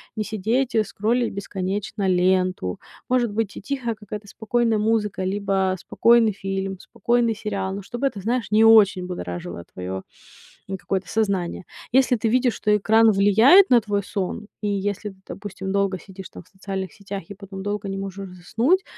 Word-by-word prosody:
не 215 - -1
сидеть, 225 +5 -1
э, 220 - +4
скроллить 230 +4 -1
бесконечно 195 +1 -3
ленту. 185 - +1 0.3
Может 245 -3 +2
быть, 210 -1 -2
ти - - -8
тихая 245 0 -2
какая-то 210 0 -8
спокойная 225 +1 0
музыка 210 -3 0
либо 190 -1 0
спокойный 230 +3 +4
фильм, 195 -1 -4
спокойный 235 +3 0
сериал, 200 -3 -3
но 200 - -5
чтобы 240 +7 -2
это, 215 - -5
знаешь, 230 +2 -1
не 215 +1 +5
очень 210 -5 +6
будоражило 90 - -6
твоё 95 +1 -4 0.8
какое-то 190 -2 -2
сознание. 195 -6 -1 0.3
Если 260 -1 +4
ты 225 - -1
видишь, 250 0 +2
что 210 0 +2
экран 220 +2 +5
влияет 220 - +6
на 245 - +7
твой 205 -1 -1
сон, 200 +2 -4
и 210 - -1
если 205 +1 -2
ты, - - -18
допустим, 195 -1 -6
долго 195 -1 +1
сидишь 190 +2 -11
там - - -11
в - - -28
социальных 190 -2 -5
сетях 200 -1 -7
и 200 - -8
потом 195 -1 -9
долго 205 0 -3
не 195 - -3
можешь 195 0 -6
заснуть, 240 - +1
205 Hz, 170 wpm, -23 LUFS, 190-225 Hz, 0.8 s, на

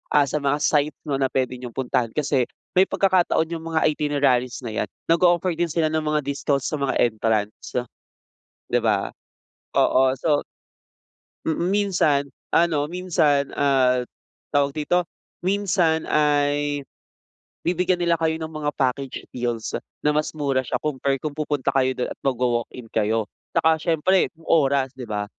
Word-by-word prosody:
ah, 145 -1 +6
sa 145 +2 -2
mga 140 0 +1
site 150 -1 +2
'no 140 -2 -2
na 135 - +2
puwede 130 -1 -2
niyong 125 -2 -8
puntahan, 125 -2 0
kasi 140 -4 +1 0.2
may 185 +1 +4
pagkakataon 180 -4 +2
yung 165 -1 -5
mga 160 -1 +1
itineraries 140 -5 0
na 115 - -4
'yan, 110 - -2 0.2
nag-ooffer 175 +1 +3
din 175 - +2
sila 160 -1 0
ng 160 0 0
mga 150 -1 +1
discounts 140 0 -1
sa 150 - -2
mga 140 -1 0
entrance, 110 -2 -1 0.9
'di - - +1
ba? - - +2 0.7
Oo, 130 0 +4
so 150 -1 +1 1.0
mm, 160 +1 0
minsan, 175 -8 +2 0.3
ano 155 -4 +2
minsan, 155 -6 +1
ah, 130 -3 +3 0.5
tawag 140 -1 +2
dito? 175 +4 +1 0.4
Minsan 185 -5 +2
ay, 145 -1 +1 0.8
bibigyan 180 +1 +1
nila 170 -1 +3
kayo 160 0 0
ng 160 - -4
mga 150 -1 -2
package 130 0 -1
deals 120 -2 -3 0.3
na 150 - +2
mas 150 0 0
mura 140 -3 +1
siya - - -1
compare 135 -2 -1
kung 155 -2 -3
pupunta 145 -3 -1
kayo 130 -1 +2
dun 125 - -2
at - - -8
magwa-walk-in 120 -2 -1
kayo, 110 0 0 0.2
'tsaka 160 0 +3
siyempre 175 +3 +2
yung 165 - -19
oras, 140 -4 +3
'di 125 - -6
ba? 105 -1 -2
145 Hz, 150 wpm, -23 LUFS, 130-160 Hz, 1.0 s, ah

